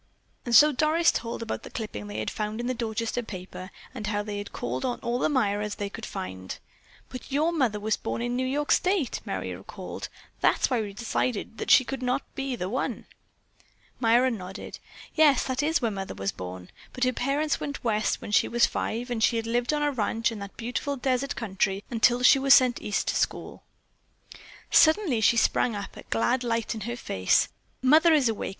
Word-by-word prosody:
And 235 - +2
so 300 +4 +8
Doris 310 +4 +3
told 230 0 -4
about 225 - -4
the - - -10
clipping 210 - -6
they 105 +1 -6
had 110 - -2
found 215 +1 -4
in 240 - -3
the 255 - 0
Dorchester 230 0 -2
paper, 185 -3 -8 0.2
and 215 -5 -5
how 205 -1 -1
they 205 -1 -4
had 205 - -7
called 125 +2 -4
on 245 - -2
all 240 +1 -1
the - - +1
Myras 210 -6 0
they 200 -1 -4
could 225 0 -7
find. 95 0 -6 0.5
"But 255 +1 -9
your 305 +5 +2
mother 255 -10 0
was 215 +1 0
born - - -4
in 240 +1 -2
New 255 +1 0
York 290 +3 -1
state," 365 - +1
Merry - - -4
recalled. - - -8 0.3
"That - - +2
is - - +3
why 245 -3 +2
we 205 -2 -5
decided 230 0 -2
that - - -4
she - - +7
could 270 +1 -5
not 250 +2 0
be 270 -1 -3
the 180 -6 -4
one." 250 +7 -3 0.9
Myra 240 +2 +4
nodded. 190 -3 -7 0.3
"Yes, 300 -5 +5
that 260 0 -1
is 315 -1 +1
where 230 - +1
Mother 195 -1 -5
was 95 0 -2
born, 90 0 -8 0.2
but 255 - -2
her 255 0 +2
parents 285 +5 0
went 285 -1 -5
West 215 -2 0
when - - -6
she - - +4
was 240 0 +3
five, 240 +3 -3
and 225 -2 -1
she 230 -1 +3
lived 240 +3 0
on 300 -1 0
a 295 - +2
ranch 230 -2 0
in 220 - -6
that 200 -1 -9
beautiful 250 +4 -3
desert 260 +1 -1
country 195 -2 -1
until 240 +1 +3
she 270 - +7
was 275 0 +7
sent 255 -2 +3
East 210 -1 -1
to - - -1
school." - - -2 1.1
Suddenly 315 - +4
she 235 - +4
sprang 230 0 +2
up, 200 -1 -6
a - - -9
glad 115 - +1
light 230 -1 -1
in 220 - -7
her 240 - -4
face. 95 - +1 0.3
"Mother 310 +6 +6
is 280 -5 +3
awake! 225 -2 -2
235 Hz, 205 wpm, -27 LUFS, 210-260 Hz, 1.1 s, so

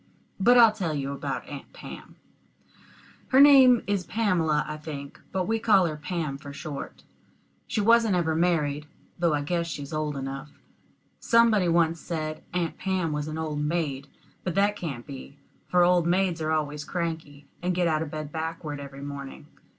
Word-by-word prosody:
But 245 +6 +6
I'll 230 -2 +8
tell 180 -8 -3
you 140 -1 -3
about 140 - -4
Aunt - - -9
Pam - - -10 1.1
her 260 - +4
name 265 -4 +8
is 200 -2 0
Pamela, 170 -8 +1
I 150 - -5
think, 145 -2 -8
but 185 -1 -1
we 225 +1 +1
call 205 -5 +4
her 155 -2 -2
Pam 150 -2 -4
for 140 0 -9
short. 145 0 -7 0.6
She 215 - -1
wasn't 230 -1 +4
ever 165 -3 +1
married, 155 -3 0 0.3
though 170 -3 +2
I 145 - -1
guess 170 +2 -1
she's 145 -2 -6
old 155 -2 -2
enough. 135 +2 -5 0.7
Somebody 230 -5 +4
once 165 -1 +2
said 155 -2 -4
Aunt 175 -2 -2
Pam 185 -4 -1
was 150 0 -2
an 155 0 -4
old 155 -2 -3
maid; 150 -3 -2 0.4
but 180 -3 -3
that 205 +1 +3
can't 140 -11 -5
be, 140 0 -10 0.3
for 180 0 +4
old 175 -1 +3
maids 180 -1 +1
are 155 - -1
always 150 -1 -1
cranky, 160 -4 -4 0.2
and 180 0 -1
get 175 -1 +2
out 155 -1 +1
of 160 - -3
bed 155 -1 -6
backward 160 -2 -4
every 140 0 -9
morning. 140 -1 -7
160 Hz, 175 wpm, -26 LUFS, 150-180 Hz, 1.1 s, I'll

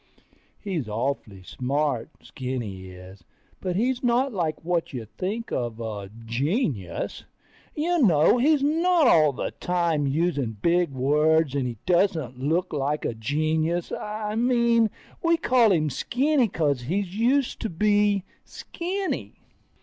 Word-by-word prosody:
He's 170 - -3
awful 110 -4 -3
smart, 135 +4 -1
Skinny 120 -8 -5
is, 90 0 -12 0.4
but 180 -1 -3
he's 245 +5 0
not 245 +2 +1
like 165 -4 -2
what 170 -3 -1
you 120 -4 -5
think 190 - -5
of 120 -2 -3
a 105 -4 -5 0.2
genius. 120 - -2 0.5
You 345 +3 +1
know, 175 - +4
he's 290 +2 +3
not 330 +2 +3
all 155 - +5
the 130 - -4
time 170 -5 0
using 140 -6 0
big 175 - +2
words, 150 +3 +2
and 135 -3 0
he 120 -2 -5
doesn't 170 - +1
look 165 +6 0
like 145 +1 -1
a - - -1
genius. 155 +8 -1
I 210 0 -4
mean, 235 -1 +3 0.3
we 335 -1 +3
call 245 -8 +4
him 155 -5 +1
Skinny 265 - +1
'cause 145 - 0
he 155 +11 -2
used 235 +8 0
to 225 - -2
be 205 +2 +2 0.2
Skinny. 375 +3 -4
165 Hz, 135 wpm, -25 LUFS, -, 0.5 s, all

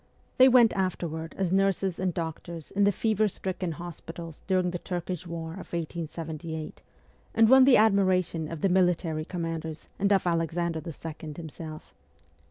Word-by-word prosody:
They 260 +1 +9
went 240 -3 +6
afterward 170 -4 -3
as 190 -3 0
nurses 195 -1 +1
and 185 -1 +1
doctors 165 -1 -6
in 200 0 +3
the 205 - +5
fever 215 +1 +1
stricken 185 -3 -3
hospitals 165 0 -8
during 185 -2 +2
the 175 - -4
Turkish 180 0 -4
war 165 -1 -5
of 190 +3 -9
1878, 160 -1 -5 0.5
and 225 0 +6
won 260 +2 +8
the 265 -2 +7
admiration 185 -6 +2
of 165 -3 -6
the 195 - +3
military 175 -4 +1
commanders 165 -2 -5
and 200 +1 +2
of 195 -2 +3
Alexander 165 -1 0
II. 160 -1 -7
himself. 160 -1 -8
175 Hz, 150 wpm, -28 LUFS, 165-190 Hz, 0.5 s, They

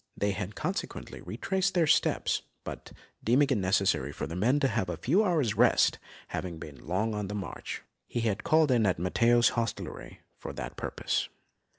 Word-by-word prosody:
They 100 0 +1
had 95 +1 -4
consequently 185 +6 -4
retraced 190 0 -1
their 170 -2 +4
steps, 150 - +2 0.2
but - - -8 0.3
deeming 135 +5 +4
it 130 - +3
necessary 95 -7 +2
for - - -4
his 80 - -6
men 120 +10 +3
to 135 - +4
have 95 -8 -1
a 85 - -3
few 170 - +3
hours' 155 - +2
rest, - - +4 0.3
having 90 -3 -4
been 75 -2 -10
long 105 +6 0
on 105 -1 -2
the 105 - -4
march, 95 -5 -5 0.2
he 120 - -2
had 110 -4 -1
called 155 -2 +4
in 115 -4 +4
at 90 - +1
Matteo's 115 +7 +4
hostelry 115 -2 -4 0.2
for - - -6
that - - -6
purpose. - - -2
110 Hz, 180 wpm, -29 LUFS, 95-140 Hz, 0.3 s, their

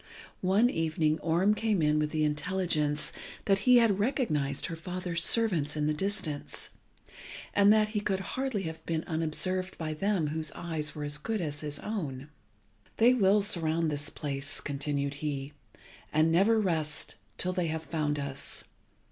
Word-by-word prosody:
One 195 +6 +4
evening 160 -5 +1
Orm 170 +6 +3
came 215 -2 +1
in 150 0 +3
with 150 0 +1
the 155 0 0
intelligence 150 -1 0 0.3
that 195 -1 +3
he 250 - +9
had 220 -5 +4
recognised 180 - 0
her 165 - -4
father's 175 0 -3
servants 170 -11 +3
in 150 - +1
the 155 - +2
distance, 155 -4 -2 0.8
and 205 0 +6
that 215 0 +4
he 215 -1 -1
could 195 -2 -1
hardly 260 -7 -1
have 160 -1 -6
been 165 -1 -1
unobserved 185 +3 -1
by 155 -2 -3
them 180 -1 0
whose 155 0 -2
eyes 155 -3 -3
were 150 - -4
as 145 0 -2
good 220 +6 -2
as 150 -4 -3
his 150 -1 -2
own. 150 -10 -4 0.7
"They 240 +3 +6
will 205 -3 +4
surround 165 -4 +1
this 145 0 -2
place," 140 -1 -4
continued 140 0 -2
he, 145 -1 -3 0.6
"and 155 +1 +3
never 200 +7 +4
rest 160 -6 -1 0.2
till 185 0 +1
they 180 -2 0
have 160 0 -3
found 150 -3 -1
us. 140 -1 -3
160 Hz, 160 wpm, -30 LUFS, 150-195 Hz, 0.8 s, he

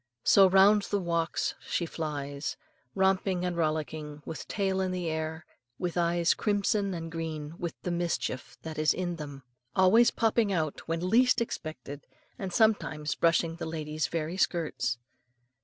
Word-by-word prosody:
So 195 -1 +7
round 195 +3 +6
the 205 - +1
walks 170 -2 -1
she 170 - -2
flies, 145 -3 -4 0.4
romping 190 -1 +2
and 180 -1 -1
rollicking, 155 -2 -2
with 160 - -6
tail 190 -2 0
in 190 - 0
the 180 -2 -2
air, 160 0 -4 0.3
and 175 -2 -2
eyes 170 0 +2
crimson 205 -2 0
and 165 -1 -6
green 160 -2 -4
with 170 -1 -4
the 180 - -2
mischief 170 -6 -2
that 160 -1 -5
is 155 - +3
in 175 -2 -2
them; 145 -3 -8 0.3
always 220 +6 +6
popping 225 -2 +1
out 155 -5 -1
when 165 +2 -1
least 250 +5 +4
expected, 155 - -5 0.3
and 190 -2 -4
sometimes 175 -9 +2
brushing 165 0 +2
the 170 - -4
lady's 155 -1 -2
very 165 +2 -3
skirts. 160 -9 0
170 Hz, 150 wpm, -29 LUFS, 155-190 Hz, 0.4 s, So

